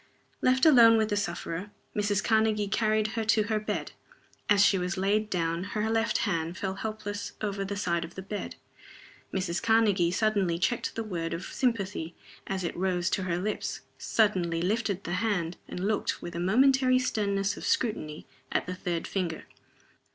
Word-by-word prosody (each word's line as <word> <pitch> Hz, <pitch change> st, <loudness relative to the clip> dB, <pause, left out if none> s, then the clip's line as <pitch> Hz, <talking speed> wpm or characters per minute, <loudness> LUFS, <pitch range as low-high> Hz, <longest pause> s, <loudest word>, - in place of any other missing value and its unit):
Left 260 Hz, +2 st, +3 dB
alone 235 Hz, -7 st, +8 dB
with 220 Hz, -1 st, +1 dB
the 205 Hz, -, +1 dB
sufferer, 180 Hz, -1 st, -3 dB, 0.3 s
Mrs. 205 Hz, -2 st, +1 dB
Karnegie 220 Hz, -2 st, +2 dB
carried 215 Hz, -1 st, +2 dB
her 225 Hz, 0 st, -2 dB
to 220 Hz, 0 st, +3 dB
her 215 Hz, +1 st, 0 dB
bed. 215 Hz, -, -3 dB, 0.6 s
As 205 Hz, -1 st, +6 dB
she 195 Hz, -, +4 dB
was 180 Hz, +2 st, -2 dB
laid 210 Hz, +3 st, +1 dB
down 170 Hz, -2 st, -1 dB
her 210 Hz, +2 st, -2 dB
left 225 Hz, 0 st, +1 dB
hand 170 Hz, -3 st, -1 dB
fell 190 Hz, -2 st, -2 dB
helpless 205 Hz, 0 st, -5 dB
over 200 Hz, -2 st, -2 dB
the 200 Hz, +1 st, -4 dB
side 170 Hz, -4 st, 0 dB
of 165 Hz, +1 st, -9 dB
the 190 Hz, -, -6 dB
bed. 205 Hz, +1 st, -5 dB, 0.8 s
Mrs. 185 Hz, -2 st, -1 dB
Karnegie 215 Hz, -6 st, +3 dB
suddenly 195 Hz, -3 st, +1 dB
checked 230 Hz, +7 st, -1 dB
the 225 Hz, -, -2 dB
word 170 Hz, -6 st, -3 dB
of 170 Hz, -, -6 dB
sympathy 200 Hz, -9 st, -1 dB, 0.3 s
as 190 Hz, -1 st, -2 dB
it 170 Hz, -, -3 dB
rose 180 Hz, -1 st, 0 dB
to -, -, +1 dB
her 170 Hz, -2 st, 0 dB
lips 205 Hz, +4 st, -3 dB, 0.2 s
suddenly 185 Hz, -6 st, +1 dB
lifted 200 Hz, +1 st, -1 dB
the 175 Hz, -, -5 dB
hand, 180 Hz, -6 st, -1 dB
and 180 Hz, -, -6 dB
looked, 210 Hz, 0 st, 0 dB
with 175 Hz, -, -7 dB
a 170 Hz, -, -4 dB
momentary 255 Hz, +7 st, +4 dB
sternness 200 Hz, -5 st, 0 dB
of -, -, -9 dB
scrutiny, 155 Hz, -10 st, -1 dB, 0.3 s
at -, -, 0 dB
the 180 Hz, -, -4 dB
third 175 Hz, -2 st, -3 dB
finger. 175 Hz, -5 st, -3 dB
200 Hz, 175 wpm, -28 LUFS, 180-220 Hz, 0.8 s, alone